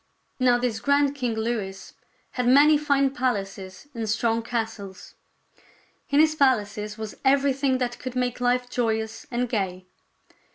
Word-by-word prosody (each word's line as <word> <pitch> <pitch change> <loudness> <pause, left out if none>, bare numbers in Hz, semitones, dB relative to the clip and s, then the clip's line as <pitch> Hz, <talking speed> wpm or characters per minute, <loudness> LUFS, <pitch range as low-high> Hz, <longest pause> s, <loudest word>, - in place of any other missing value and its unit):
Now 250 -1 +4
this 240 -2 -2
grand 280 +2 +2
King 250 -5 -2
Louis 215 -4 -4 0.4
had 250 -1 -2
many 290 +4 +6
fine 280 -2 +2
palaces 195 -4 -3
and 225 -3 -4
'strong 230 +1 +1
castles. 225 -5 -5 1.0
In 280 - +3
his 310 0 +5
palaces 210 -7 0
was 220 -1 -7
everything 275 -1 +2
that 245 -1 -3
could 255 -1 -6
make 250 -1 -1
life 245 0 +1
joyous 220 -2 -2
and 245 0 -1
gay. 190 -5 -3
245 Hz, 135 wpm, -25 LUFS, 220-265 Hz, 1.0 s, many